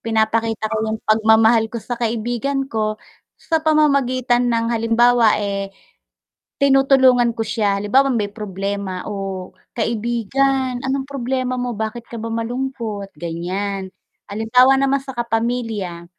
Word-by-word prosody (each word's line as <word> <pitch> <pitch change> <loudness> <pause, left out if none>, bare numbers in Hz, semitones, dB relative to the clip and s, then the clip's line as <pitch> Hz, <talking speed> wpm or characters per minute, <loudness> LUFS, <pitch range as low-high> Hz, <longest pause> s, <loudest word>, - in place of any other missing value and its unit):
pinapakita 225 0 0
ko - - 0
yung 220 0 -2
pagmamahal 220 +1 +4
ko 235 - -6
sa 240 +1 -5
kaibigan 240 +4 -1
ko 215 -1 -1 0.4
sa 320 -1 -1
pamamagitan 255 -6 +2
ng 230 -1 0
halimbawa, 230 0 +3
eh, 200 -1 -2 0.9
tinutulungan 265 -3 +4
ko 225 - -1
siya 210 -2 0
halimbawa 250 +8 +3
may 205 -3 -1
problema, 200 -2 -4
"Oh, 195 -3 -5 0.2
kaibigan 245 +3 0
anong 265 +1 -2
problema 255 -1 -2
mo 245 0 -2
bakit 220 +2 -4
ka 235 - -8
ba 225 - -4
malungkot?" 230 -3 -4
ganyan. 190 +4 -4 0.4
Halimbawa 250 +6 +4
naman 275 0 +2
sa 270 - -7
kapamilya, 225 -6 -2
230 Hz, 120 wpm, -20 LUFS, 215-255 Hz, 0.9 s, pagmamahal